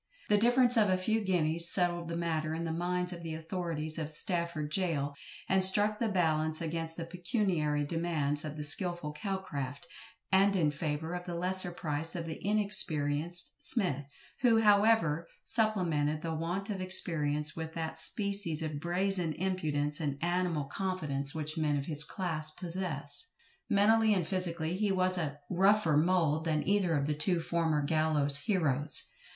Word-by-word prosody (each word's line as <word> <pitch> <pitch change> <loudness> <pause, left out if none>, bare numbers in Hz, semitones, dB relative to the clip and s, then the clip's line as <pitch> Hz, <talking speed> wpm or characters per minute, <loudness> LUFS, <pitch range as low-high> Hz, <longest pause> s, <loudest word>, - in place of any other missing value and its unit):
The 210 - +4
difference 245 +2 +6
of 210 -3 +4
a 185 - +2
few 220 +4 -1
guineas 170 -3 +3
settled 175 -2 +2
the 170 - -3
matter 160 -2 -2
in 165 - -4
the 165 - -3
minds 180 +2 -2
of 170 - -9
the 165 -1 -5
authorities 160 -1 -4
of 155 -2 -4
Stafford 165 -2 -1
gaol, 155 -7 -1 0.3
and 190 0 +3
struck 205 +3 +4
the 230 - 0
balance 160 -4 0
against 165 0 -4
the 165 - -5
pecuniary 170 -4 -1
demands 150 -2 -1
of 155 -1 -6
the 150 - -5
skilful 175 +1 +1
CALCRAFT, 150 -7 -5 0.5
and 195 +1 +4
in 155 -5 +2
favour 150 +2 -4
of 180 0 -5
the 175 - -4
lesser 180 +1 0
price 160 -1 -4
of 170 -2 -4
the 160 -1 -7
inexperienced 175 -6 +1
SMITH, 175 - 0 0.3
who, 230 -3 +3
however, 205 -7 +3 0.2
supplemented 170 -10 +2
the 165 -1 -3
want 175 +6 -3
of 195 -2 -4
experience 155 -5 0
with 160 0 -6
that 160 -1 -3
species 200 -7 +3
of 155 -2 -4
brazen 180 0 -1
impudence 150 -5 -1
and 145 -3 -3
animal 175 -3 -1
confidence 145 -4 -3
which 155 0 -4
men 150 -2 0
of 140 - -4
his 150 -2 +1
class 155 -3 -4
possess. 170 - -5 0.4
Mentally 215 +1 +3
and 175 -4 -2
physically 175 -2 -2
he 210 0 0
was 185 -1 +1
of 145 -3 -3
rougher 190 -3 +3
mould 160 -1 +1
than 155 -2 -1
either 190 -5 +1
of 140 - -1
the 150 - -1
two 170 +4 0
former 165 -3 -1
gallows 150 -2 +2
heroes. 150 - +1
170 Hz, 160 wpm, -31 LUFS, 155-185 Hz, 0.5 s, difference